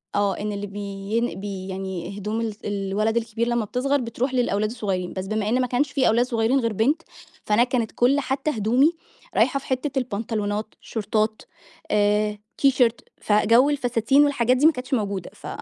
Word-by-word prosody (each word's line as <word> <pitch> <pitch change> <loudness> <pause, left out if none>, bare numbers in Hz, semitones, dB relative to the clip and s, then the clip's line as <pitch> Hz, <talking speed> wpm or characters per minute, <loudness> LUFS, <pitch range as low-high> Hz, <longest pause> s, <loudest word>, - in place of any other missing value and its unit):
آه، 205 -1 +1
إن 210 0 -2
اللي 205 0 -4
بين 200 +2 -3
بي 195 -2 -5
يعني 190 0 -5
هدوم 210 +3 -2
ال 220 -2 -3
الولد 205 +2 -1
الكبير 230 0 -1
لمّا 240 -2 0
بتصغر 265 +6 0
بتروح 245 +2 -2
للأولاد 215 -4 +1
الصغيرين، 195 -6 -3
بس 190 0 -4
بما 215 0 -1
إن 250 +3 +2
ما 250 - 0
كانش 270 +4 0
في 275 -2 +2
أولاد 235 +2 +3
صغيرين 240 +1 +1
غير 230 -3 -1
بنت، 270 - +1 0.4
فأنا 215 +3 +4
كانت 245 -3 -1
كل 260 +4 +3
حتى 270 +2 -1
هدومي 245 +6 +3 0.4
رايحة 275 - +3
في - - -15
حتّة 265 +1 -1
البنطلونات 215 -2 -3
شورتات 215 0 -1 0.5
آآ، 210 0 +2 0.2
تيشيرت، 250 -4 +2
فجو 230 +6 +4
الفساتين 250 -1 +3
والحاجات 255 -3 +2
دي 285 - +3
ما 320 - +8
كانتش 255 -2 -6
موجودة، 200 -6 -1
ف - - -11
225 Hz, 175 wpm, -24 LUFS, 205-255 Hz, 0.5 s, ما